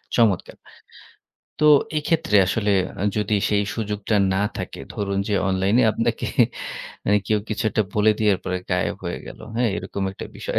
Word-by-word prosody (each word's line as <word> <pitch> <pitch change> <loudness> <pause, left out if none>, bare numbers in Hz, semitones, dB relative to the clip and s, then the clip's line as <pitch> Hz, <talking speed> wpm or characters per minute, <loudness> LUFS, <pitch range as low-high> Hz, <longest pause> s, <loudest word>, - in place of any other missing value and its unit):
চমৎকার। 110 -7 +2 1.0
তো 150 - +3 0.3
এক্ষেত্রে 155 -5 +1
আসলে 105 +1 +1 0.3
আ - - 0
যদি 105 0 +1
সেই 105 -1 +2
সুযোগটা 105 -1 -2 0.2
না 95 - +1 0.2
থাকে - - -6
ধরুন 100 -2 -2
যে - - +1
অনলাইনে 95 +5 +2
আপনাকে 115 - -1 0.8
মানে 105 0 +4
কেউ 110 - +2
কিছু 110 +2 -2
একটা 110 - +2
বলে 105 +1 +4
দিয়ার 105 -3 +3
পরে 90 0 -1
গায়েব 90 0 0
হয়ে - - -3
গেল - - -10 0.2
হ্যাঁ 120 -1 +2
এরকম 100 - -5
একটা - - -8
বিষয়। - - -2
105 Hz, 160 wpm, -23 LUFS, 100-110 Hz, 1.0 s, মানে